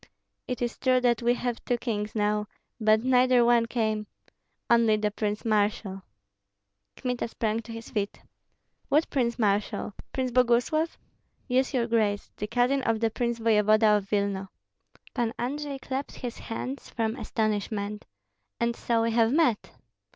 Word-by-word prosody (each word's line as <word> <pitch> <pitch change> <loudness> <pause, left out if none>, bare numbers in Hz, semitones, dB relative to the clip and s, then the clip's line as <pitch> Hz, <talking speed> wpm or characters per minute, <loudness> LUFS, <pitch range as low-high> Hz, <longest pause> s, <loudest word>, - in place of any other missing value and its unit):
"It 250 -1 -2
is 240 - -3
true 255 -1 +3
that 240 -2 +2
we 240 +1 +3
have 245 -1 -3
two 245 - 0
kings 215 -3 -3
now, 210 0 +1 0.3
but 215 0 +3
neither 255 -1 +4
one 235 -1 +4
came, 220 -3 -1 0.6
only 230 -2 +4
the 210 0 0
prince 210 +1 -3
marshal." 205 -2 0 0.9
Kmita 250 -2 -2
sprang 225 -1 -1
to 230 0 -9
his 230 0 -8
feet. 205 -2 -2 0.7
"What 305 +3 +3
prince 235 -4 0
marshal? 205 -2 0 0.2
Prince 255 -1 -1
Boguslav?" 250 +6 +2 0.5
"Yes, 260 0 +2
your 240 -2 +2
grace; 215 -3 0
the 210 - -3
cousin 250 +4 +2
of 230 -3 0
the 225 0 +1
prince 235 +1 -1
voevoda 215 -1 +4
of 200 -1 -6
Vilna." 200 -2 -1 0.6
Pan 235 -2 -1
Andrei 280 +3 -3
clapped 270 +1 -4
his 245 -2 -6
hands 255 +4 -5
from 225 -1 -1
astonishment. 210 -3 -2 0.5
"And 235 0 +1
so 230 -1 0
we 230 - +1
have 225 0 +3
met." 285 -8 +2
230 Hz, 150 wpm, -27 LUFS, 215-245 Hz, 0.9 s, neither